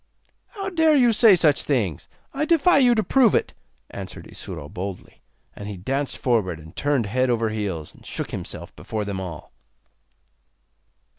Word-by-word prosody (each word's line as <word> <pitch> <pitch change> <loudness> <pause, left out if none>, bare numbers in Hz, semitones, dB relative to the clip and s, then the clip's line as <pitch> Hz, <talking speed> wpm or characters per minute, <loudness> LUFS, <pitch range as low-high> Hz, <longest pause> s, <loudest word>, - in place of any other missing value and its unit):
'How 395 -4 -6
dare 320 -3 +4
you 245 -4 +5
say 210 -2 +7
such 155 -4 +3
things? 110 - -1 0.2
I 285 +2 -1
defy 330 -1 +4
you 245 -3 +5
to 220 - +1
prove 240 +2 +4
it,' - - 0 0.4
answered - - -8
Isuro 75 - -8
boldly. 95 +2 -7 0.3
And 100 - -8
he 100 - -6
danced 135 +9 -2
forward, 105 -10 0
and 80 +1 -14
turned 140 -5 +1
head 130 +5 0
over 115 -2 +1
heels, 100 -8 -4
and - - -19
shook - - -5
himself - - -7
before 110 -2 -4
them 100 -2 -4
all. 85 -5 -8
125 Hz, 160 wpm, -23 LUFS, -, 0.4 s, say